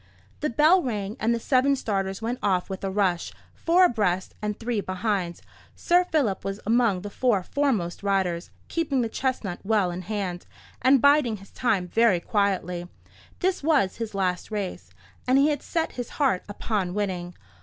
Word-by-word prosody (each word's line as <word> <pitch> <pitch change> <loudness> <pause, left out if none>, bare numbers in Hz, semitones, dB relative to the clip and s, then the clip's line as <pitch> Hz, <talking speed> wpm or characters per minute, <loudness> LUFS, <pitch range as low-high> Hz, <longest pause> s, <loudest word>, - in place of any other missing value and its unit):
The 300 - -1
bell 310 +9 +5
rang, 210 - -3
and 225 - +1
the 235 - +1
seven 265 +3 +3
starters 195 -4 -2
went 240 +2 -2
off 190 -1 0
with 190 - -6
a 195 - -1
rush; 190 -3 0 0.2
four 355 +2 +4
abreast, 195 - 0
and 210 0 -3
three 230 -2 -1
behind. 185 -2 -2 0.3
Sir 355 +1 +3
Philip 275 - 0
was 195 +1 -4
among 225 -4 +2
the 205 - -6
four 220 -5 +1
foremost 225 -10 -1
riders, 190 -4 0 0.2
keeping 295 -6 0
the 230 - -1
chestnut 235 -8 -2
well 200 -3 +2
in 175 +1 -5
hand, 185 -2 -4 0.3
and 260 0 +4
biding 285 -6 +4
his 195 0 -16
time 205 -7 0
very 225 -1 +3
quietly. 180 -3 -1 0.5
This 375 0 +1
was 285 -11 +2
his 225 -3 -5
last 180 -2 -1
race, 205 -4 -4 0.4
and 255 +1 +4
he 280 +2 +5
had 290 -2 -1
set 330 -1 -2
his 245 -2 -6
heart 265 -11 +2
upon 200 -3 -2
winning. 180 -4 -3
210 Hz, 170 wpm, -25 LUFS, 190-255 Hz, 0.5 s, bell